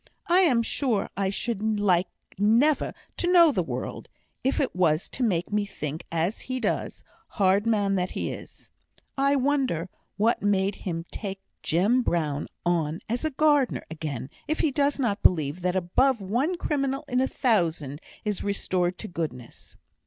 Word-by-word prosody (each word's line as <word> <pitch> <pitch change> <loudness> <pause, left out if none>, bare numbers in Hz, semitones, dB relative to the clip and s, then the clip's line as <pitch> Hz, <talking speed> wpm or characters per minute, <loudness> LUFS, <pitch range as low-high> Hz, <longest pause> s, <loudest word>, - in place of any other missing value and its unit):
I 350 +2 +4
am 265 -11 +4
sure 230 -4 0
I 195 0 0
should 215 +1 -1
like 185 -3 +3 0.3
never 230 +10 +3 0.3
to 350 - +1
know 340 -3 +7
the - - 0
world, - - -5 0.3
if 265 - +1
it 270 - 0
was 165 -4 +2
to - - -6
make 190 -5 0
me 210 0 +2
think 160 -5 -6
as 170 +6 -1
he 255 0 -3
does, - - -2 0.2
hard 200 +2 +2
man 205 -3 +2
that 180 0 0
he - - -3
is! - - -10 0.4
I 275 +1 +3
wonder 260 - 0 0.3
what 225 +3 +2
made 200 -1 +2
him 170 -4 -5
take 195 -2 -5 0.2
Jem 205 +10 +2
Brown 155 - -1 0.2
on 165 0 0
as 240 +2 -2
gardener 290 -4 +3
again, 145 -5 -5 0.2
if 310 - 0
he 310 - +2
does 285 +1 +1
not 230 -7 0
believe 155 -1 +2
that 180 +1 0
above 230 +8 +2
one 245 - 0
criminal 275 -2 -1
in 250 -1 +1
a 265 - +2
thousand 165 - 0 0.2
is 210 -2 -1
restored 185 -3 0
to 215 - -5
goodness. 150 - -6
205 Hz, 160 wpm, -26 LUFS, 175-260 Hz, 0.4 s, know